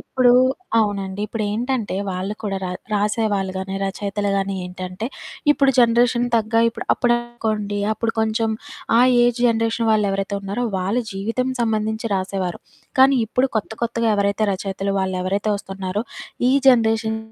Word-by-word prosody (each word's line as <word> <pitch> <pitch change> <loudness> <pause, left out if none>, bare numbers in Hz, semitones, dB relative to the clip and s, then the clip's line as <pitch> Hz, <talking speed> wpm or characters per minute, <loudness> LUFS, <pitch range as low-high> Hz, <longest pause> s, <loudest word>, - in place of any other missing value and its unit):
ఇప్పుడూ 250 -2 +3 0.5
అవునండి. 200 -2 -1
ఇప్పుడేంటంటే, 225 +2 -2
వాళ్ళు 190 +2 -3
కూడా 195 -2 -2
ర - - -2 0.2
రాసేవాళ్ళు 205 -2 0
గానీ, 190 +1 -4
రచయితలు 200 +1 -2
గానీ 195 0 -1
ఏంటంటే, 185 +4 -6 0.4
ఇప్పుడు 275 -2 +4
జనరేషన్ 240 +1 +4
తగ్గా 225 +1 +2
ఇప్పుడు. 230 - -6
అప్పుడనుకోండి, 235 -4 -1
అప్పుడు 225 +1 -2
కొంచెం 220 0 0 0.5
ఆ - - +6 0.2
ఏజ్ 240 0 +1
జనరేషన్ 230 0 +1
వాళ్ళేవరైతే 200 -1 0
ఉన్నారో, 200 +5 -3
వాళ్ళు 200 +7 0
జీవితం 225 +6 -2
సంబంధించి 220 0 -1
రాసేవారు, 185 -2 -2 0.4
కానీ 270 +1 +6
ఇప్పుడు 255 +4 +1
కొత్త 215 - -2
కొత్తగా 230 0 0
ఎవరైతే 200 +1 +1
రచయితలు 195 +1 -3
వాళ్ళెవరైతే 190 +2 -1
ఒస్తన్నారో, 195 +1 -4 0.5
ఈ - - +3 0.2
జనరేషన్ 225 -2 +3
215 Hz, 130 wpm, -21 LUFS, 195-230 Hz, 0.5 s, ఆ